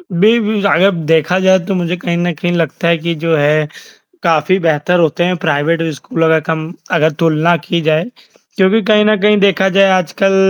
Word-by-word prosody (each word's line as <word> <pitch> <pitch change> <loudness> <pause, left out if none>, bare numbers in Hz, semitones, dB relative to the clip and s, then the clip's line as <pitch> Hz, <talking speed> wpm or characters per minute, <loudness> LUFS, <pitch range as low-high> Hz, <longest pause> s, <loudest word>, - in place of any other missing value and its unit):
अ, - - -19
B 215 +7 +3
B 210 -2 -2
अगर 190 +4 +3 0.2
देखा 165 +4 +1
जाए 190 0 +3
तो 195 - -2
मुझे 180 0 -2
कहीं 170 0 -3
न 175 0 -1
कहीं 175 +3 -3
लगता 170 0 -2
है 170 -1 +2
कि 170 +1 -3
जो 165 -1 +1
है 150 +1 +1 0.6
काफ़ी 165 +2 +1
बेहतर 165 +1 0
होते 165 +1 0
हैं 180 +1 0
प्राइवेट 160 +4 0
स्कूलों 165 +3 -2
का 160 0 +3
कम 160 +1 -3 0.2
अगर 160 -1 +2
तुलना 165 +2 +2
की 170 -1 -2
जाए। 160 +1 +1 0.5
क्योंकि 195 +4 +2
कहीं 210 +1 +3
न 215 - +3
कहीं 210 0 +3
देखा 195 -1 +2
जाए 195 0 +5
आजकल 195 +3 -1
170 Hz, 200 wpm, -14 LUFS, 160-190 Hz, 0.6 s, जाए